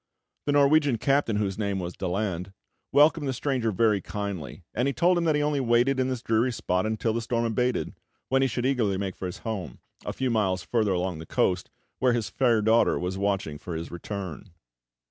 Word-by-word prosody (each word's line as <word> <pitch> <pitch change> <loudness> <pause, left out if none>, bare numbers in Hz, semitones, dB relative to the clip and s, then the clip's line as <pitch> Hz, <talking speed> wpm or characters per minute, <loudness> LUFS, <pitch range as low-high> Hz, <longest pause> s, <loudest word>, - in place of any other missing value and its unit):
The 145 - +2
Norwegian 145 -2 +4
captain, 135 -2 +1
whose 100 -1 -1
name 100 -2 -1
was 90 -1 -4
Daland, 95 -1 -2 0.4
welcomed 145 +1 +4
the 135 - 0
stranger 125 -3 -1
very 105 0 +2
kindly; 100 -5 -5
and 125 +4 0
he 140 - -1
told 175 +7 +4
him 170 -1 0
that 155 -2 +3
he 150 - +1
only 150 -1 +1
waited 125 +2 +2
in 130 - +2
this 130 -2 -3
dreary 115 +3 +2
spot 90 -3 -1
until 110 +1 -1
the 115 - -1
storm 115 +1 -1
abated, 125 +2 0 0.3
when 135 +1 +2
he 135 - +4
should 125 0 -2
eagerly 115 -8 +1
make 95 -1 -3
for 95 - -5
his 90 - -6
home, 95 - -4 0.3
a - - -3
few 130 -2 -1
miles 95 -5 +1
further 110 -2 +1
along 90 -2 -2
the 80 - -9
coast, 90 -1 0 0.3
where 130 -1 +3
his 115 -3 -2
fair 120 -5 +2
daughter 110 +2 +4
was 90 +1 -3
watching 100 -7 -1
for 85 +2 -6
his 80 +1 -5
return. 95 0 -6
110 Hz, 205 wpm, -26 LUFS, 95-130 Hz, 0.4 s, Norwegian